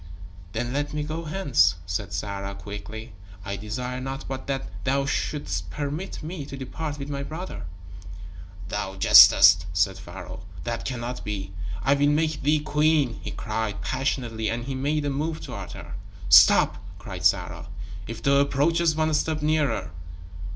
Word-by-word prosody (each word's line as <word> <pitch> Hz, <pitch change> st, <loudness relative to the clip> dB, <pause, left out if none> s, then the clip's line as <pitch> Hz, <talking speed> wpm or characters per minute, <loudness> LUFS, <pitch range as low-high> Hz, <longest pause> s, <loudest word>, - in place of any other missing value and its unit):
"Then 120 Hz, +2 st, -2 dB
let 145 Hz, +1 st, -2 dB
me 150 Hz, -, -1 dB
go 160 Hz, +2 st, -4 dB
hence," 140 Hz, -, +3 dB
said 80 Hz, +6 st, -3 dB
Sarah, 100 Hz, +1 st, -4 dB
quickly. 110 Hz, +3 st, -8 dB, 0.3 s
"I 100 Hz, -1 st, -3 dB
desire 125 Hz, +5 st, -4 dB
naught 135 Hz, +1 st, -5 dB
but 135 Hz, 0 st, -5 dB
that 135 Hz, -1 st, -2 dB, 0.2 s
thou 135 Hz, +3 st, +1 dB
shouldst 145 Hz, +1 st, -2 dB
permit 150 Hz, +5 st, -4 dB
me 160 Hz, -1 st, -5 dB
to 140 Hz, -, -7 dB
depart 145 Hz, +3 st, -5 dB
with 140 Hz, -1 st, -6 dB
my 140 Hz, -1 st, -3 dB
brother." 160 Hz, -, -6 dB, 1.0 s
"Thou 95 Hz, -2 st, -3 dB
jestest," 95 Hz, -, +8 dB
said 95 Hz, +2 st, +1 dB
Pharaoh. 90 Hz, 0 st, -9 dB, 0.2 s
"That 115 Hz, -1 st, -3 dB
cannot 125 Hz, -1 st, -4 dB
be. 100 Hz, -2 st, -5 dB, 0.3 s
I 140 Hz, -, +4 dB
will 145 Hz, +1 st, +3 dB
make 155 Hz, +1 st, +1 dB
thee 150 Hz, +2 st, +2 dB
queen," 150 Hz, -4 st, +2 dB
he -, -, -5 dB
cried, 110 Hz, -2 st, -3 dB
passionately 120 Hz, -4 st, -1 dB
and 120 Hz, +1 st, -2 dB
he 135 Hz, -, -3 dB
made 145 Hz, +3 st, -1 dB
a 145 Hz, -, 0 dB
move 155 Hz, +3 st, -2 dB
toward -, -, -7 dB
her. -, -, -9 dB, 0.4 s
"Stop!" -, -, +7 dB, 0.2 s
cried -, -, -8 dB
Sarah. -, -, +1 dB, 0.4 s
"If 115 Hz, +1 st, -7 dB
thou 140 Hz, 0 st, +5 dB
approachest 155 Hz, +3 st, +2 dB
one 155 Hz, 0 st, +1 dB
step 155 Hz, 0 st, 0 dB
nearer...." 150 Hz, -, +1 dB
135 Hz, 155 wpm, -25 LUFS, 110-150 Hz, 1.0 s, jestest